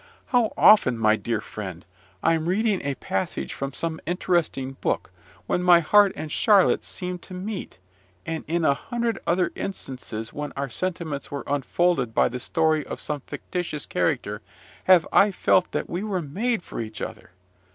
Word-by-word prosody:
How 245 Hz, -3 st, +3 dB
often, 130 Hz, -, +6 dB
my 110 Hz, -1 st, +4 dB
dear 110 Hz, -1 st, -2 dB
friend, 95 Hz, -5 st, -7 dB, 0.4 s
I'm 165 Hz, 0 st, +2 dB
reading 205 Hz, +1 st, +1 dB
a 140 Hz, -1 st, -2 dB
passage 95 Hz, -5 st, -3 dB
from 135 Hz, 0 st, -4 dB
some 160 Hz, +3 st, -3 dB
interesting 170 Hz, -6 st, 0 dB
book, -, -, -1 dB, 0.3 s
when 180 Hz, -, 0 dB
my 180 Hz, -1 st, +7 dB
heart 200 Hz, +4 st, +5 dB
and 155 Hz, -, -6 dB
Charlotte's 205 Hz, -1 st, +4 dB
seemed 180 Hz, -1 st, -5 dB
to 185 Hz, -, -10 dB
meet, 195 Hz, +1 st, -5 dB, 0.5 s
and 165 Hz, -1 st, -3 dB
in 165 Hz, +1 st, 0 dB
a 140 Hz, -, +5 dB
hundred 235 Hz, +9 st, -2 dB
other 175 Hz, 0 st, +2 dB
instances 125 Hz, -, -5 dB
when 150 Hz, -1 st, -5 dB
our 140 Hz, 0 st, -2 dB
sentiments 165 Hz, -3 st, -3 dB
were 140 Hz, -1 st, -4 dB
unfolded 140 Hz, -3 st, 0 dB
by -, -, +4 dB
the 125 Hz, -, -5 dB
story 155 Hz, +2 st, +1 dB
of -, -, -7 dB
some 150 Hz, -2 st, -3 dB
fictitious 170 Hz, -5 st, -4 dB
character, -, -, -1 dB, 0.4 s
have 185 Hz, -3 st, +6 dB
I 200 Hz, -, +6 dB
felt 185 Hz, -1 st, +2 dB
that -, -, -2 dB
we 175 Hz, -, -3 dB
were 195 Hz, -5 st, -2 dB
made 210 Hz, -, -1 dB
for -, -, -7 dB
each 110 Hz, -1 st, -5 dB
other! -, -, -7 dB
165 Hz, 165 wpm, -25 LUFS, 135-185 Hz, 0.5 s, my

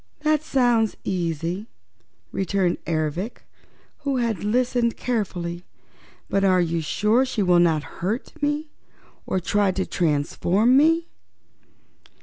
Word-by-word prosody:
"That 305 Hz, -1 st, +2 dB
sounds 240 Hz, -7 st, +2 dB
easy," 175 Hz, +2 st, -2 dB, 0.6 s
returned 190 Hz, -2 st, 0 dB
Ervic, 165 Hz, +7 st, -2 dB, 0.6 s
who 280 Hz, -2 st, -1 dB
had 230 Hz, -7 st, -1 dB
listened 240 Hz, +1 st, +1 dB
carefully. 180 Hz, -7 st, -3 dB, 0.6 s
"But 195 Hz, -, 0 dB
are 185 Hz, -2 st, +4 dB
you 170 Hz, -1 st, 0 dB
sure 210 Hz, -, +2 dB
she 250 Hz, -5 st, -1 dB
will 180 Hz, -1 st, +4 dB
not 160 Hz, -3 st, +3 dB, 0.2 s
hurt 210 Hz, +8 st, -2 dB
me, 295 Hz, +1 st, -1 dB, 0.6 s
or 190 Hz, -, 0 dB
try 200 Hz, +2 st, +1 dB
to 190 Hz, 0 st, -1 dB
transform 175 Hz, -, +1 dB
me?" 325 Hz, +4 st, +4 dB
200 Hz, 115 wpm, -23 LUFS, 175-245 Hz, 0.6 s, are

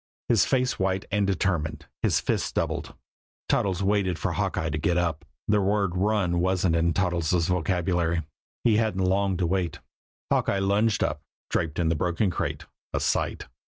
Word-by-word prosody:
His 115 Hz, -4 st, +5 dB
face 130 Hz, -1 st, +1 dB
white 95 Hz, 0 st, 0 dB
and 100 Hz, -1 st, +2 dB
determined, 90 Hz, -5 st, -1 dB, 0.2 s
his -, -, +2 dB
fists -, -, -1 dB
doubled, -, -, -2 dB, 0.5 s
Toddles 95 Hz, -1 st, +1 dB
waited 95 Hz, -3 st, +1 dB
for -, -, -1 dB
Hawkeye 80 Hz, 0 st, -1 dB
to 75 Hz, -, -1 dB
get 85 Hz, +3 st, +1 dB
up 85 Hz, -2 st, 0 dB, 0.2 s
the 105 Hz, -1 st, +3 dB
word 100 Hz, -2 st, +1 dB
"run" 95 Hz, -3 st, +1 dB
wasn't 90 Hz, -1 st, +2 dB
in 85 Hz, +1 st, +2 dB
Toddles' 85 Hz, -2 st, +1 dB
vocabulary. 85 Hz, -1 st, 0 dB, 0.4 s
He 110 Hz, -3 st, +4 dB
hadn't 105 Hz, -4 st, +1 dB
long 95 Hz, 0 st, +1 dB
to 90 Hz, -, 0 dB
wait. 90 Hz, -1 st, -1 dB, 0.5 s
Hawkeye -, -, +2 dB
lunged 100 Hz, +3 st, +2 dB
up, -, -, -1 dB, 0.3 s
draped 75 Hz, -2 st, -1 dB
in 85 Hz, -2 st, +1 dB
the 80 Hz, -, +1 dB
broken 90 Hz, +5 st, 0 dB
crate -, -, -3 dB, 0.3 s
a -, -, -1 dB
sight. -, -, -1 dB
95 Hz, 160 wpm, -26 LUFS, 85-100 Hz, 0.5 s, His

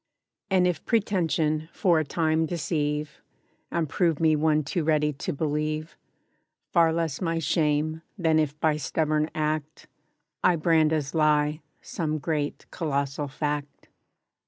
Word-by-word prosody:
And 185 Hz, -2 st, +3 dB
if 175 Hz, -3 st, 0 dB
pretention 165 Hz, -8 st, 0 dB
for 175 Hz, -5 st, +2 dB
a -, -, +1 dB
time 160 Hz, +1 st, 0 dB
deceive, 150 Hz, -2 st, -2 dB, 0.5 s
And 165 Hz, -2 st, -1 dB
prove 165 Hz, +1 st, +1 dB
me 160 Hz, -1 st, +4 dB
one 155 Hz, 0 st, +2 dB
too 160 Hz, +4 st, -2 dB
ready 150 Hz, -1 st, +2 dB
to 140 Hz, -, -4 dB
believe, 155 Hz, +1 st, -2 dB, 0.8 s
Far 165 Hz, -2 st, +4 dB
less 160 Hz, -2 st, -2 dB
my 165 Hz, -2 st, 0 dB
shame, 155 Hz, -1 st, 0 dB, 0.2 s
than 160 Hz, -4 st, +3 dB
if 150 Hz, -1 st, -1 dB
by 155 Hz, -1 st, +2 dB
stubborn 155 Hz, +1 st, 0 dB
act, 155 Hz, 0 st, -2 dB, 0.6 s
I 180 Hz, -, +5 dB
brand 160 Hz, -1 st, +3 dB
as 150 Hz, -3 st, -1 dB
lie, 150 Hz, -1 st, +2 dB, 0.2 s
some 155 Hz, -2 st, -2 dB
great 150 Hz, -1 st, -2 dB
colossal 140 Hz, -3 st, -2 dB
Fact. 145 Hz, 0 st, -4 dB
155 Hz, 135 wpm, -26 LUFS, 150-165 Hz, 0.8 s, I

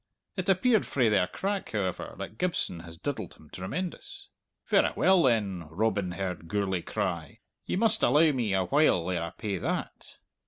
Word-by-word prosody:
It 185 Hz, 0 st, -2 dB
appeared 215 Hz, +3 st, +3 dB
frae 125 Hz, -5 st, +2 dB
their 95 Hz, -4 st, +3 dB
crack, 195 Hz, -, -3 dB
however, 95 Hz, -4 st, -2 dB
that 110 Hz, -, -7 dB
Gibson 170 Hz, -, 0 dB
has 85 Hz, 0 st, -10 dB
diddled 110 Hz, -, -4 dB
him 75 Hz, -, -19 dB
tremendous. 165 Hz, -, -5 dB, 0.4 s
'Verra -, -, +3 dB
well 190 Hz, 0 st, +5 dB
then,' 100 Hz, -, +1 dB
Robin 100 Hz, 0 st, 0 dB
heard 90 Hz, -3 st, -4 dB
Gourlay 95 Hz, -2 st, 0 dB
cry, 85 Hz, -8 st, -3 dB, 0.3 s
'you -, -, -1 dB
must 220 Hz, +1 st, +3 dB
allow 150 Hz, +5 st, +5 dB
me 115 Hz, -8 st, 0 dB
a 95 Hz, -1 st, +1 dB
while 140 Hz, -, +3 dB
ere 85 Hz, -2 st, -1 dB
I 85 Hz, -, -3 dB
pay 100 Hz, +1 st, -4 dB
that!' -, -, -4 dB
105 Hz, 165 wpm, -28 LUFS, -, 0.4 s, well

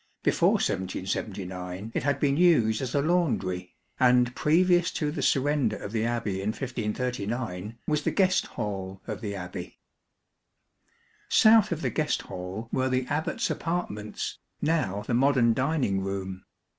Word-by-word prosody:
Before -, -, +3 dB
1779 95 Hz, +1 st, -3 dB
it -, -, 0 dB
had 145 Hz, -1 st, 0 dB
been 140 Hz, -1 st, +2 dB
used 140 Hz, -11 st, +4 dB
as 130 Hz, 0 st, -3 dB
a 140 Hz, -, +2 dB
laundry, 110 Hz, -, 0 dB, 0.2 s
and 125 Hz, -1 st, +4 dB
previous 175 Hz, +2 st, +3 dB
to 150 Hz, -2 st, -1 dB
the 150 Hz, -2 st, -4 dB
surrender 135 Hz, -5 st, +2 dB
of 105 Hz, -, -7 dB
the 110 Hz, 0 st, 0 dB
Abbey 110 Hz, -5 st, -1 dB
in 100 Hz, -, -3 dB
1539, 115 Hz, -4 st, -3 dB
was 150 Hz, -1 st, +1 dB
the -, -, 0 dB
guest 185 Hz, -2 st, +2 dB
hall 95 Hz, -4 st, -4 dB
of -, -, -5 dB
the 100 Hz, -3 st, -4 dB
Abbey. 90 Hz, -1 st, -7 dB, 1.5 s
South 215 Hz, -2 st, +6 dB
of 165 Hz, -1 st, -2 dB
the -, -, 0 dB
guest 155 Hz, -1 st, 0 dB
hall 95 Hz, +5 st, -6 dB
were 130 Hz, 0 st, +1 dB
the 130 Hz, 0 st, 0 dB
Abbat's 150 Hz, +2 st, -1 dB
apartments, 155 Hz, -12 st, -3 dB, 0.2 s
now 150 Hz, -, 0 dB
the -, -, -2 dB
modern 125 Hz, -2 st, +4 dB
dining 130 Hz, -7 st, 0 dB
room. 95 Hz, -1 st, -4 dB
120 Hz, 145 wpm, -27 LUFS, 100-145 Hz, 1.5 s, South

